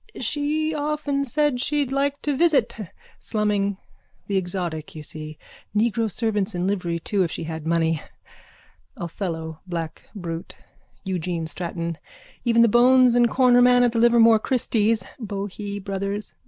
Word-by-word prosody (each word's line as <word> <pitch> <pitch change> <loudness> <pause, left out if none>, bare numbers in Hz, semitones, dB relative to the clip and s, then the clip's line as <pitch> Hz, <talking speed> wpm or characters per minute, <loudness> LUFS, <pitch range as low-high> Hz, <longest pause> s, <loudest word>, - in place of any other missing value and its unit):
_ - - -8
She 310 +2 -1
often 295 -1 -1
said 285 -1 +1
she'd 285 -1 0
like 280 +1 -1
to 290 -2 0
visit. 265 -7 +2 0.4
Slumming. 205 -2 0 0.5
The 200 - -2
exotic, 175 -5 -3
you 155 - -7
see. 155 0 -8 0.4
Negro 225 0 +1
servants 210 -2 -1
in 175 +1 -1
livery 180 -4 -1
too 200 +4 -1
if 175 - +1
she - - -5
had 160 -1 -5
money. 165 -2 +1 1.0
Othello 165 -2 -5
black 165 -3 -5
brute. 170 -3 -6 0.5
Eugene 175 -3 -2
Stratton. 170 0 -4 0.4
Even 235 -1 +4
the - - +6
bones 250 +2 +5
and 240 0 +4
cornerman 245 0 +5
at 240 - +3
the 230 - 0
Livermore 230 -1 +6
christies. 225 -3 +1 0.2
Bohee 200 0 -5
brothers. 200 +1 -4
210 Hz, 140 wpm, -23 LUFS, 175-245 Hz, 1.0 s, the